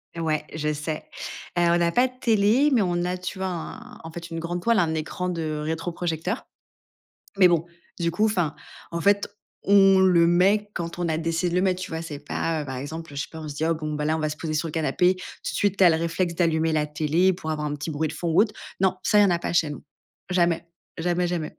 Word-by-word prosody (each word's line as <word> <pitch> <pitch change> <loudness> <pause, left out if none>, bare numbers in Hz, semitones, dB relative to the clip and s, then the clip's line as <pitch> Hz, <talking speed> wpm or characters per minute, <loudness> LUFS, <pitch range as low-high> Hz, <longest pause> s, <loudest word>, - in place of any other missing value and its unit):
Ouais, 155 -2 -1
je 150 -1 -1
sais, 155 +1 -4 0.5
heu, - - +4
on 175 0 +3
a 170 0 +2
pas 250 +5 +3
de 250 - -14
télé, 225 +6 +4
mais 235 -5 +4
on 175 -1 0
a, 180 +1 -1
tu 185 +1 -6
vois 190 - -1
un 235 +8 -7
en 165 - -8
fait 170 +1 -8
une 165 0 -4
grande 175 +1 -3
toile, 230 +2 +3
un 165 -3 +2
écran 160 +3 -3
de 160 -3 -2
rétroprojecteur. 165 +4 -3 0.9
Mais 185 -2 +7
bon, 170 -1 +1 0.3
du 170 0 +1
coup, 210 +6 +1
enfin, 175 -8 0 0.3
en 170 - -3
fait, 200 0 +3 0.4
on 195 -1 +6
le 180 -3 +5
met 200 +4 +3
quand 170 -1 -5
on 175 - 0
a 160 0 0
décidé 165 +2 0
de 175 - -1
le - - +4
mettre 185 -1 +1
tu 185 - -6
vois? 160 - -3
C'est 155 -3 -6
pas, 155 +1 -2
heu, - - -6
par 130 -2 -5
exemple, 160 +3 -7
heu, - - -9
je 140 - -1
sais - - -8
pas 160 - -8
on 155 - -6
se 145 - -6
dit: 155 - -1
«Bon 155 -1 -4
bah, 150 0 -2
là, 155 - +1
on 160 - -3
va 155 - 0
se 150 - -6
poser 155 -2 -3
sur 160 +2 -1
le - - -8
canapé», 165 +4 +2
tout 185 - -10 0.3
de - - -4
suite 200 -1 +1
tu 190 - +5
as 175 - +8
le 160 - +2
réflexe 170 +1 -1
d'allumer 165 -2 +1
la 155 -1 +1
télé 155 +5 +2
pour 165 -3 -5
avoir 150 -1 -2
un 145 - -2
petit 150 +2 -5
bruit 155 +1 -1
de 150 - -6
fond 170 - -3
ou 160 - +5
autre. 215 -1 +2 0.3
Non, 190 -1 +2
ça, 210 - +3
il - - +8
y - - +6
en 195 - +3
a 170 - +2
pas - - -3
chez 165 -3 +3
nous. 145 - -8 0.5
Jamais, 170 -2 +1 0.3
jamais, 175 +1 +1
jamais. 170 -3 -4
170 Hz, 265 wpm, -25 LUFS, 160-185 Hz, 0.9 s, as